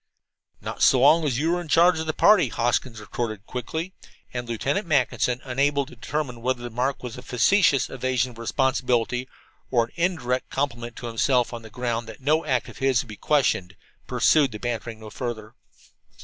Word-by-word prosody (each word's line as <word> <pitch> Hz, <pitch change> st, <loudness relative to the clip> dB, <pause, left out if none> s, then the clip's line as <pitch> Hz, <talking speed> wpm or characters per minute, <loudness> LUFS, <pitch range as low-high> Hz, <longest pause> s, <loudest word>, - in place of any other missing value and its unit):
"Not -, -, -6 dB
so 130 Hz, -, +5 dB
long 155 Hz, +4 st, +6 dB
as 130 Hz, -5 st, 0 dB
you 160 Hz, +5 st, +1 dB
were 175 Hz, 0 st, 0 dB
in 175 Hz, -, -9 dB
charge 170 Hz, +2 st, +4 dB
of 160 Hz, -, -4 dB
the -, -, +2 dB
party," 210 Hz, +6 st, +5 dB
Hoskins 120 Hz, -1 st, -1 dB
retorted 110 Hz, -2 st, -5 dB
quickly. 160 Hz, +10 st, -5 dB, 0.4 s
And 120 Hz, -1 st, -4 dB
Lieutenant 140 Hz, -, -1 dB
Mackinson, 125 Hz, -4 st, +1 dB
unable 140 Hz, +2 st, +1 dB
to 130 Hz, -, -14 dB
determine 125 Hz, 0 st, -4 dB
whether 125 Hz, 0 st, -1 dB
the 120 Hz, -, -4 dB
remark 130 Hz, +4 st, -1 dB
was 125 Hz, 0 st, -6 dB
a -, -, -9 dB
facetious 135 Hz, -, +3 dB
evasion 130 Hz, -1 st, -1 dB
of 115 Hz, -, -14 dB
responsibility 125 Hz, 0 st, 0 dB, 0.4 s
or 120 Hz, -3 st, +3 dB
an 115 Hz, -, -20 dB
indirect 160 Hz, -8 st, -1 dB
compliment 120 Hz, -4 st, -3 dB
to -, -, -8 dB
himself, 120 Hz, +2 st, +1 dB
on 120 Hz, -, -6 dB
the 110 Hz, -, -12 dB
ground 120 Hz, 0 st, -3 dB
that 110 Hz, -, -10 dB
no 155 Hz, +4 st, +2 dB
act 130 Hz, -5 st, 0 dB
of -, -, -12 dB
his 135 Hz, -3 st, +2 dB
would 120 Hz, -, -17 dB
be 110 Hz, -, -7 dB
questioned, 110 Hz, -10 st, +1 dB, 0.3 s
pursued 145 Hz, -5 st, +3 dB
his 105 Hz, -, -6 dB
bantering 120 Hz, -1 st, -4 dB
no 110 Hz, -1 st, -10 dB
further. 115 Hz, -2 st, -5 dB
125 Hz, 190 wpm, -24 LUFS, 120-145 Hz, 0.4 s, long